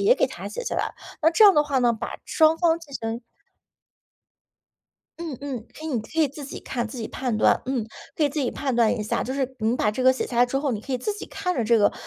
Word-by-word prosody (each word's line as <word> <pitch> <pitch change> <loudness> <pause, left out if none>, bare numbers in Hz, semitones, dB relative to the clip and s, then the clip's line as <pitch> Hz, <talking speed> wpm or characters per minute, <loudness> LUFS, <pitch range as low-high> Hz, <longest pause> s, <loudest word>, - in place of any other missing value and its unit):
也 465 +5 +5
给 - - +3
它 - - -7
写 - - -5
下 - - -2
来。 - - -1 0.3
那 320 - +6
这 430 +6 +6
样 400 -2 +8
的 295 - +5
话 285 -3 0
呢， 240 -1 +3
把 220 - -5
双 320 0 +4
方 335 -2 +3
进 295 -4 -14
行 230 0 -4 2.0
嗯， 325 -6 -5
嗯， 255 -5 -5
可 310 - -9
以 320 - -3
你 245 -6 0
可 220 - -13
以 310 - +5
自 285 +2 -9
己 275 - -7
看， 240 -3 -3
自 250 - -9
己 225 - -4
判 250 -4 -2
断， - - +4
嗯， 250 -5 -1 0.3
可 310 - +2
以 - - +3
自 300 - -2
己 255 - 0
判 270 -4 -2
断 235 0 +3
一 210 - -2
下。 210 - -1
就 260 - -3
是 265 -1 -2
你 225 +2 +1
把 210 - +2
这 255 +5 -3
个 260 - +7
写 260 - -3
下 240 - -3
来 245 - +6
之 270 +2 -1
后， 280 -3 0
你 210 - -3
可 270 - -11
以 - - +2
自 420 - -2
己 410 - -8
看 365 -2 -2
着 245 - 0
这 230 +1 +4
个， 205 - +4
260 Hz, 300 characters per minute, -24 LUFS, 235-310 Hz, 2.0 s, 样